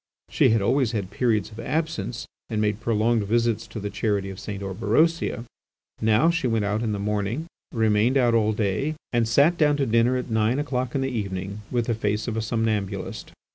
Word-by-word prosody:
She - - +4
had 110 -2 +2
always 125 +1 +2
had 100 -3 -3
periods 110 -1 0
of 110 - -11
absence, 130 -8 -2 0.2
and 110 -2 -1
made 105 -1 0
prolonged 115 0 +1
visits 115 +1 +1
to 110 - -7
the 100 0 -4
Charity 100 -3 -1
of 95 - -9
St. 100 -1 -6
Orberosia; 115 - +1 0.6
now, 110 +10 +4
she 165 -6 0
went 115 -3 +1
out 105 +2 0
in 115 -2 -1
the 105 - -1
morning, 105 +7 -2 0.3
remained 110 +2 +2
out 120 -3 +3
all 110 -2 +3
day, 110 +8 -1 0.2
and 120 -1 +2
sat 145 +9 +4
down 150 -2 +4
to 140 - +1
dinner 115 +2 +3
at 125 -1 -5
nine 110 +3 +2
o'clock 130 -4 -2
in 135 - +1
the 135 - 0
evening 100 -2 -4
with 120 -2 0
the 115 - 0
face 105 0 -1
of 115 - -2
a 110 - -1
somnambulist. 110 -3 -2
115 Hz, 200 wpm, -24 LUFS, 105-125 Hz, 0.6 s, She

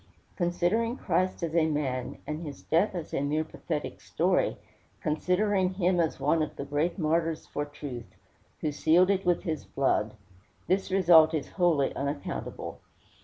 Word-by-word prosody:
Considering 185 +7 0
Christ 185 0 0
as 165 -1 -2
a 160 -2 +4
man, 135 -5 -2
and 150 +1 -4
his 145 -4 -8
death 170 +6 +2
as 170 -3 -6
a - - 0
mere 150 +2 0
pathetic 160 - -5
story, - - +1 0.4
considering 185 +4 +1
him 180 -1 +2
as 165 -2 0
one 165 - +2
of 155 - -3
the 140 - -5
great 145 +6 -1
martyrs 165 -1 0
for 145 - -3
truth, 145 -5 -8 0.5
who 150 - 0
sealed 170 +6 +4
it 190 -2 -1
with 175 -1 +2
his 160 -5 -3
blood, 110 -5 0 0.5
this 190 +1 +1
result 170 -4 +6
is 150 - -3
wholly 170 -7 +2
unaccountable. 140 +1 -4
165 Hz, 155 wpm, -28 LUFS, 150-180 Hz, 0.5 s, result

